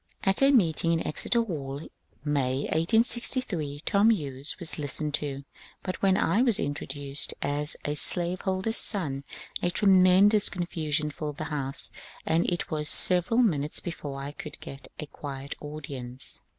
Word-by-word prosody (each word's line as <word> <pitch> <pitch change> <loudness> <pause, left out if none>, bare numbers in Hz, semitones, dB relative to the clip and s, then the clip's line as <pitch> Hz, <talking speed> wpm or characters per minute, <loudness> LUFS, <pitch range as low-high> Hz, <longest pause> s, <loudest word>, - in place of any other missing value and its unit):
At 195 +4 +2
a 275 - +5
meeting 170 - +2
in 165 - -2
Exeter 235 +9 +1
Hall, 140 -9 -6 0.5
May, 135 -3 -1
1868, 180 - -1
Tom 205 +3 +3
Hughes 145 - +2
was 165 -3 -1
listened 150 +1 -3
to, 140 -2 -3 0.4
but 185 - -5
when 195 -1 +3
I 200 +6 +1
was 240 -5 +4
introduced 140 0 -2
as 145 +1 0
a 145 - -1
slaveholder's 185 +6 +2
son 145 -10 +5 0.4
a 175 - 0
tremendous 195 +2 +4
confusion 155 -4 -3
filled 150 0 -6
the 155 - -4
house, 140 0 -1 0.3
and 165 +2 +1
it 175 -1 -4
was 150 -1 0
several 185 +7 +4
minutes 150 -8 0
before 145 -5 -7
I 140 +1 -6
could 150 0 -9
get 135 0 -8
a 150 - -5
quiet 140 -1 -8
audience. 135 -4 -6
155 Hz, 145 wpm, -26 LUFS, 145-190 Hz, 0.5 s, a